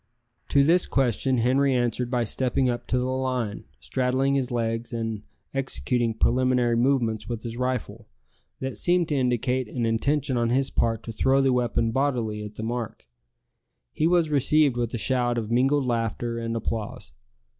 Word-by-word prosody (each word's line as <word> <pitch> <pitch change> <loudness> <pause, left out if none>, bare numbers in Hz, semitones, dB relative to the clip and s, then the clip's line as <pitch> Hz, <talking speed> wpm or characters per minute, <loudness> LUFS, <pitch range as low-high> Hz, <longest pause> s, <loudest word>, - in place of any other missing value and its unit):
To 140 - +4
this 170 +5 +3
question 130 0 +1
Henri 130 +3 +2
answered 120 0 0
by 125 -1 +1
stepping 130 +3 0
up 120 - -5
to 125 - +1
the 125 - 0
line, 130 -4 -2
straddling 130 - 0
his 135 -2 0
legs, 115 0 -2
and 115 -3 -3 0.3
executing 125 -3 0
preliminary 125 0 +2
movements 120 -3 +1
with 115 -2 -4
his 115 -1 -5
rifle, 125 -3 -3 0.5
that 130 0 -4
seemed 175 -1 +2
to 150 - 0
indicate 125 -1 0
an 120 +1 -2
intention 135 +4 0
on 120 -1 +1
his 135 +2 +1
part 115 -1 0
to 115 - -6
throw 130 +4 +2
the 135 -1 +3
weapon 120 -2 +1
bodily 115 -5 -1
at 105 0 -9
the 110 - -6
mark. 115 0 -4 0.9
He 155 - +1
was 170 -3 +2
received 145 -1 +3
with 120 -1 -1
a - - -1
shout 120 0 +1
of 110 -1 -3
mingled 135 +3 +2
laughter 115 0 -2
and 115 0 -3
applause. 115 - -4
125 Hz, 165 wpm, -25 LUFS, 115-135 Hz, 0.9 s, To